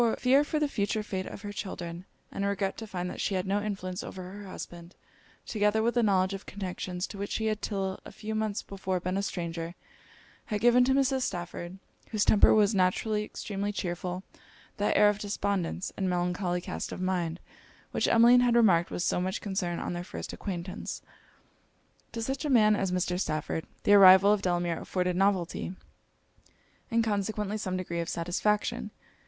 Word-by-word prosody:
Fear 265 +3 +4
for 305 - -2
the 300 - +2
future 215 -4 -1
fate 190 -2 -4
of 200 - -9
her 205 0 -5
children, 175 -3 -6 0.3
and 200 - -3
regret 200 -1 0
to 225 - -7
find 180 -3 -3
that - - -6
she 195 - 0
had 185 0 -1
no 200 +2 0
influence 190 -3 -4
over 185 - -7
her 205 +1 -9
husband, 175 -1 -9 0.5
together 215 0 +1
with 235 +1 +2
the 240 - +3
knowledge 190 -3 +2
of 195 - -7
connections 185 -2 -4
to 200 - -9
which 200 - -3
she 220 - -1
had 215 -1 0
till 195 -2 -2
a - - -10
few 220 0 -6
months 215 -1 -1
before 190 -2 -3
been 185 +1 -2
a 195 - +1
stranger, 170 -3 -4 0.7
had 210 - -2
given 240 +2 +5
to 265 +1 +3
Mrs. 270 -1 +2
Stafford, 175 -2 -4 0.3
whose 215 -2 +1
temper 210 - +6
was 210 0 +4
naturally 210 +3 +1
extremely 205 -1 -4
chearful, 180 -1 -4 0.5
that 205 - +1
air 210 - +7
of 205 0 +2
despondence, 200 -3 -2
and 190 -1 -1
melancholy 180 0 0
cast - - -5
of - - -6
mind, 180 -2 -1 0.5
which - - +1
Emmeline 235 +2 +7
had 245 -1 +3
remarked 185 -8 +4
with 175 - -3
so 180 - +1
much 185 +1 -2
concern 190 -4 -2
on - - -3
their 175 0 -4
first - - -7
acquaintance. 185 0 -5 1.1
To 230 - -3
such 270 +5 -2
a 300 - -1
man 215 -5 +5
as 195 -3 -1
Mr. 180 0 0
Stafford, 155 -1 -2 0.2
the 205 - +5
arrival 195 0 +9
of 210 - 0
Delamere 175 -2 0
afforded 180 -1 -1
novelty, 190 -1 0 1.1
and 230 -1 +2
consequently 210 0 -1
some 185 -3 -2
degree 170 -2 -3
of 170 - -2
satisfaction. 180 +5 0
195 Hz, 180 wpm, -29 LUFS, 180-210 Hz, 1.1 s, arrival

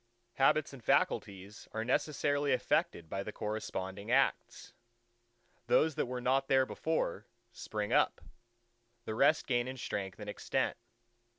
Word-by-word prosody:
Habits 140 +2 +3
and 130 -4 -11
faculties 100 0 0
are 110 0 -2
necessarily 145 +1 +1
affected 85 -8 0
by 95 +4 -3
the 105 - -5
corresponding 105 -1 -4
acts. 125 - +1 0.9
Those 155 +6 +4
that - - -1
were 125 0 -3
not 135 +2 +1
there 130 -1 +4
before, 130 - -2 0.2
spring 105 -2 -4
up: - - +3 0.9
the 110 - -3
rest 140 +7 +3
gain 120 -2 +1
in 130 0 -5
strength 95 -6 -4
and - - -7
extent. - - -1
120 Hz, 130 wpm, -33 LUFS, 105-135 Hz, 0.9 s, Those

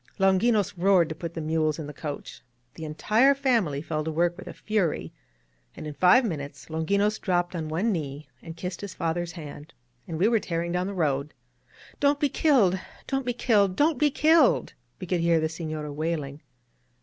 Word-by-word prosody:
Longinos 200 +1 +3
roared 180 -3 +4
to - - -3
put 170 +1 -7
the 165 - -3
mules 155 -1 0
in 155 - -5
the 150 - -8
coach. 145 0 -7 0.3
The 160 - -8
entire 220 - +3
family 230 - +1
fell 155 -2 -2
to 160 - -3
work 170 +2 +1
with - - -11
a - - -7
fury, 210 -7 -1 0.6
and - - -8
in 150 - -5
five 185 - +5
min 165 -9 -2
utes 140 +1 -10
Longinos 200 +7 +1
dropped 175 -2 0
on 160 -2 -4
one 185 +9 0
knee 150 -4 -4
and 165 0 -9
kissed 180 0 -5
his 200 -3 -7
father's 170 +1 -2
hand, 150 -2 -10 0.3
and 165 - -4
we 185 +6 +3
were 230 -1 +3
tearing 170 -2 -3
down 180 +1 -1
the 200 - -5
road. 145 -4 -1 0.6
"Don't 285 0 +3
be 290 - +2
killed! 235 - +3 0.3
Don't 270 -2 -2
be 245 - +1
killed! 205 -6 +2
Don't 295 - +2
be 300 - +4
killed!" 315 +4 +3 0.3
we 185 - -5
could 180 0 0
hear 170 -1 +3
the 160 - 0
Sefiora 155 -2 -5
wailing. 150 -2 -3
175 Hz, 195 wpm, -26 LUFS, 155-210 Hz, 0.6 s, five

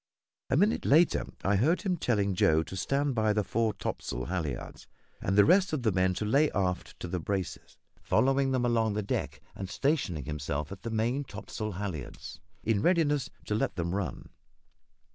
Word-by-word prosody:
A - - +2
minute 205 +6 +3
later 160 +4 +4 0.2
I 100 +1 +3
heard 155 - +2
him 190 -3 +1
telling 105 - +1
Joe 80 -3 +3
to 95 - -8
stand 140 +8 0
by 110 -2 +2
the 105 0 +1
fore 115 +2 0
topsail - - -4
halliards, 80 -8 -4 0.3
and 95 +2 0
the 105 - +8
rest 185 +1 +4
of 140 -5 -1
the 110 - +3
men 95 0 +2
to 105 - -2
lay 140 +8 +3
aft 90 -2 -2
to - - -4
the 90 +1 -2
braces, 95 +2 -4 0.2
following 135 0 +2
them 130 -2 +1
along 115 -3 +2
the 105 - -1
deck - - -3
and 95 -1 -6
stationing 135 - 0
himself 75 0 -3
at 95 - -8
the 115 - -4
main 115 +5 0
topsail 110 -5 -6
halliards 90 -8 -6 0.2
in 110 -3 +1
readiness 150 - +2 0.2
to - - -2
let 105 - 0
them 85 -1 -2
run. 100 -2 -4
105 Hz, 180 wpm, -29 LUFS, 90-135 Hz, 0.3 s, the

